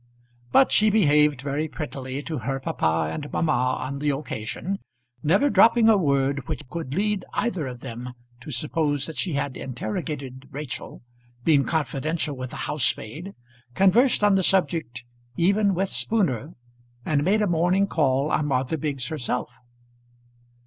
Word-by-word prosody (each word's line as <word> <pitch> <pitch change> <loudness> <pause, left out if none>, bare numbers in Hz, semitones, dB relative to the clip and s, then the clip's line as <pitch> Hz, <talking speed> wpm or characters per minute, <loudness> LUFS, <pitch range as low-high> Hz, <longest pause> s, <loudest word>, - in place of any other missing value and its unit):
But 270 - +5
she 215 0 +5
behaved 150 - +3
very 145 +2 -1
prettily 140 -2 -5
to 155 -3 -4
her 135 +4 -2
papa 80 -10 0
and 145 -1 -6
mamma 130 -5 +1
on 140 +2 -4
the 150 +1 0
occasion, 145 - -3 0.4
never 190 - +3
dropping 230 -4 +5
a 220 - +7
word 140 -6 +1
which - - -5
could 145 -2 -5
lead 205 0 0
either 185 - -1
of 125 -1 -8
them 120 +2 -7 0.3
to 125 - -11
suppose 145 +1 0
that 160 - -6
she 180 - 0
had 140 -2 -2
interrogated 130 +2 -5
Rachel, 140 -4 -7 0.4
been 145 -2 +4
confidential 155 -1 -1
with 130 -1 -6
the - - -9
housemaid, 150 - -1 0.4
conversed 210 +6 +4
on 205 -1 +5
the 195 - +3
subject 165 -10 0 0.3
even 200 +2 +3
with 190 +2 0
Spooner, 165 - 0 0.5
and 145 -2 +1
made 210 +5 +3
a - - +2
morning 175 +3 +2
call 145 -5 +1
on 150 - +1
Martha 135 +3 0
Biggs 135 -4 -2
herself. 125 -5 -3
150 Hz, 150 wpm, -24 LUFS, 130-180 Hz, 0.5 s, a